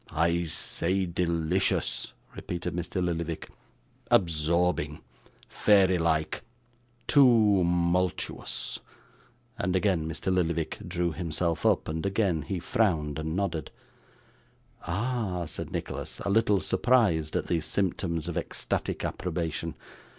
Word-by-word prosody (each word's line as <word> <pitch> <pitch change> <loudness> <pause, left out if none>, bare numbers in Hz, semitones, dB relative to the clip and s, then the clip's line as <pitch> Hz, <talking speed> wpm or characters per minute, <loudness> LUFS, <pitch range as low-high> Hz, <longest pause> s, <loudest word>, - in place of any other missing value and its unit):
'I 85 +2 +1
say, 95 +4 -1
delicious,' 85 +1 0 0.2
repeated 90 0 -4
Mr. 90 +1 -2
Lillyvick. 85 -2 -3 0.6
'Absorbing, 85 -2 +2 0.5
fairy 95 -3 +4
like, 80 -2 0 0.7
toomultuous,' 90 - +2 0.8
and 90 +1 0
again 90 -4 +1
Mr. 80 +4 -2
Lillyvick 85 -3 0
drew 85 0 0
himself 85 0 -1
up, - - +2
and 80 +1 -3
again 100 -5 +1
he 95 +6 -3
frowned 80 -6 0
and 80 +1 -3
nodded. 90 -5 -1 1.2
'Ah!' 100 -2 -1
said - - -5
Nicholas, - - -5
a 100 - -1
little 105 -2 +3
surprised 100 -12 +2
at - - 0
these 80 -2 -1
symptoms 85 -4 -1
of 85 - -1
ecstatic - - -2
approbation. 85 -2 -3
85 Hz, 105 wpm, -28 LUFS, 80-95 Hz, 1.2 s, fairy